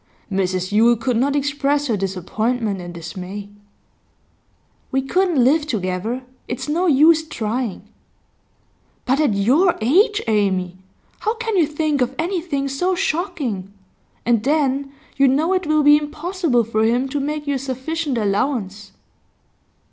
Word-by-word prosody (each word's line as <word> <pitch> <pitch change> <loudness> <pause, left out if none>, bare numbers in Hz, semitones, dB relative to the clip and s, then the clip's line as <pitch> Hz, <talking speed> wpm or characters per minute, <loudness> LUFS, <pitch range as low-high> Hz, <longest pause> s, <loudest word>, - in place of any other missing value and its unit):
Mrs 185 -1 -1
Yule 230 +3 +5
could 235 +2 -1
not 275 +5 +1
express 285 0 0
her 235 -6 0
disappointment 200 +3 -2
and 175 0 -7
dismay. 185 +4 -7 1.4
'We 265 0 0
couldn't 345 -2 +2
live 295 +4 +3
together; 215 +1 -2 0.2
it's 245 - -4
no 340 +5 +1
use 315 +2 +5
trying.' 225 - -3 1.2
'But 265 +2 +1
at 290 -9 +2
your 280 - +3
age, 400 - +3
Amy! 190 -4 0 0.4
How 435 +1 -1
can 455 -2 -3
you 335 -5 +3
think 300 -2 -1
of 250 +2 0
anything 330 -5 -2
so 355 +8 0
shocking? 310 - -2 0.5
And 230 -2 +2
then, 280 -1 +1 0.3
you 275 0 +5
know 305 +8 +2
it 370 -3 -1
will 305 -1 +3
be 295 +1 +7
impossible 300 -3 -1
for 220 0 0
him 240 +4 +2
to 290 +2 -2
make 295 +2 -3
you 285 - 0
a 270 - -1
sufficient 275 +2 -3
allowance. 205 -1 -2
270 Hz, 140 wpm, -20 LUFS, 215-310 Hz, 1.4 s, be